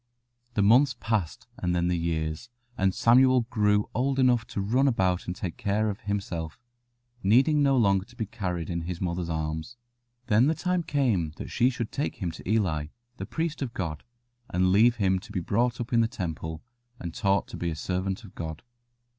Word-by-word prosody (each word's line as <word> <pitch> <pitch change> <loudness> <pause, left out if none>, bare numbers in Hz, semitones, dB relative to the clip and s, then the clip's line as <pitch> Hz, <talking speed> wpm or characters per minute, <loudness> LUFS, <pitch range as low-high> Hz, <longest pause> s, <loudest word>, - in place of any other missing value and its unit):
The 105 - +3
months 130 +6 +5
passed 105 -8 -2
and 90 0 0
then 85 0 +1
the 90 - +1
years, 80 +3 -2 0.3
and 95 -2 +2
Samuel 130 +5 +5
grew 105 -2 +2
old 135 +3 0
enough 125 -4 +3
to - - -5
run 120 +8 +2
about 95 -8 +1
and 90 - -3
take 90 -2 -5
care 105 +2 0
of 100 - -8
himself, 95 -6 -4 0.6
needing 130 +9 +4
no 135 -2 +4
longer 100 -4 +3
to 120 - -19
be 115 -3 -2
carried 90 -6 -4
in 85 0 -2
his 85 +1 -5
mother's 85 -1 -2
arms. 80 +7 -3 0.5
Then 110 +4 +4
the 160 - +2
time 180 +1 0
came 120 - 0
that - - -7
she 125 - +3
should 120 -3 -4
take 145 - -2
him 90 -5 -3
to 80 - -9
Eli, 90 -9 +1 0.3
the - - -6
priest 165 -1 -3
of 125 -4 -4
God, 80 -6 -4 0.5
and 90 +1 +2
leave 115 +5 +5
him 95 -4 +1
to 100 - -13
be 100 - -1
brought 115 +7 0
up 120 0 -4
in 115 - +5
the 115 - +3
Temple 80 -8 -5 0.4
and 85 -2 -6
taught 100 -1 +1
to - - -7
be 85 - -2
a 80 - -3
servant 95 +6 -2
of 100 - -13
God. 80 +1 -6
100 Hz, 195 wpm, -27 LUFS, 85-120 Hz, 0.6 s, months